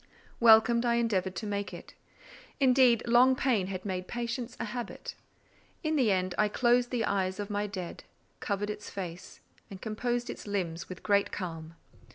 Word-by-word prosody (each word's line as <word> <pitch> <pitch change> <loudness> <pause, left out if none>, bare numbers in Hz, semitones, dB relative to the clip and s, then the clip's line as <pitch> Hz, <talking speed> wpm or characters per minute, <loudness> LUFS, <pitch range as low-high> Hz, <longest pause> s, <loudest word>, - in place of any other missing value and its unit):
Welcome 235 +1 +6
I 235 -1 +2
endeavoured 195 -6 0
to 215 - -4
make 205 -1 -3
it. - - -12 0.7
Indeed, 255 -3 +5
long 245 +2 +5
pain 240 -8 +1
had 185 0 -5
made 185 -2 -3
patience 240 0 -4
a - - -2
habit. 240 +2 -6 0.7
In 310 0 0
the 250 -8 +3
end 185 -1 0
I 210 - +4
closed 240 +2 +2
the 235 -3 0
eyes 190 -1 -1
of 205 0 -4
my 205 0 -1
dead, 185 -4 -6 0.4
covered 205 0 -2
its 210 - -8
face, 180 -3 -7 0.3
and 195 - -9
composed 240 +3 -2
its - - -10
limbs 175 -5 -3
with 185 - -9
great 200 -1 +2
calm. 165 -3 -6
210 Hz, 170 wpm, -30 LUFS, 190-240 Hz, 0.7 s, Welcome